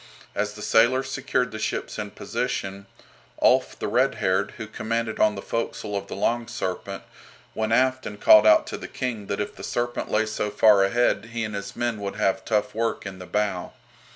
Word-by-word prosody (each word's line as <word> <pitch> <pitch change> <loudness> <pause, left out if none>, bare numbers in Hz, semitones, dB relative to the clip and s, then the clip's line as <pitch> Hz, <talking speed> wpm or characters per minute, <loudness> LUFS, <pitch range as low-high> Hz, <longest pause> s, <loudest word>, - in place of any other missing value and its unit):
As 105 +1 -1
the 105 0 -9
sailors 130 +5 +3
secured 125 -1 0
the 110 - -6
ships - - -3
in - - -4
position, 100 +1 -4 0.5
Ulf - - +3
the - - -3
Red - - +2
haired, 95 +2 0
who 110 - -5
commanded 110 +1 -3
on 105 -1 +4
the 100 - -7
forecastle 110 -2 -3
of 100 0 -3
the - - -6
"Long 115 +4 0
Serpent," 100 -3 -4 0.5
went 110 0 -1
aft 130 +2 +2
and 105 -1 -8
called 110 0 +7
out 105 - +6
to - - -5
the - - -7
King 115 -6 -4
that 100 - -2
if 105 - -3
the - - -10
"Serpent" 120 0 -2
lay 110 +1 +2
so 110 -1 -2
far 105 -1 +5
ahead 105 0 +2
he 115 -1 -1
and 105 -1 -4
his 100 0 -5
men 120 -3 -1
would 100 -1 -4
have 95 -2 +1
tough 105 -2 0
work 115 -1 -1
in 95 -1 -7
the 90 - -9
bow. 100 -4 -1
105 Hz, 205 wpm, -25 LUFS, 100-115 Hz, 0.5 s, called